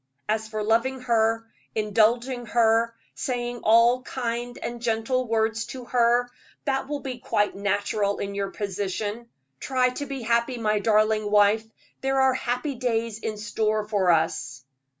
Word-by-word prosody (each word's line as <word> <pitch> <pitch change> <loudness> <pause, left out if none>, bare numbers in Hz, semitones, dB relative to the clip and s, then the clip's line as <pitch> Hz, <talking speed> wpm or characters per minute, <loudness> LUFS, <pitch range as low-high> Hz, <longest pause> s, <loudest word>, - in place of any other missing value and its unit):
As 220 +1 0
for 215 -1 -3
loving 235 +4 +1
her, 225 -2 +1 0.3
indulging 230 +4 +1
her, 230 0 +3 0.2
saying 245 -1 -3
all 235 +3 +5
kind 245 -1 -4
and 240 0 -5
gentle 240 +2 0
words 225 0 0
to 255 -2 -8
her, 240 0 +3 0.4
that 270 -2 0
will 290 0 -3
be 255 -2 -5
quite 205 -3 0
natural 200 0 0
in 200 0 -4
your 200 -1 -2
position. 205 +3 -4 0.3
Try 255 -1 +1
to 285 +3 -5
be 270 -3 -5
happy, 235 +2 +1
my 215 -2 +1
darling 215 0 +2
wife; 210 +1 +4 0.4
there 270 0 +1
are 265 0 +4
happy 250 +3 -2
days 230 -3 -1
in 215 -1 -4
store 215 0 -1
for 200 -4 +1
us." 130 -5 0
230 Hz, 150 wpm, -25 LUFS, 215-245 Hz, 0.4 s, all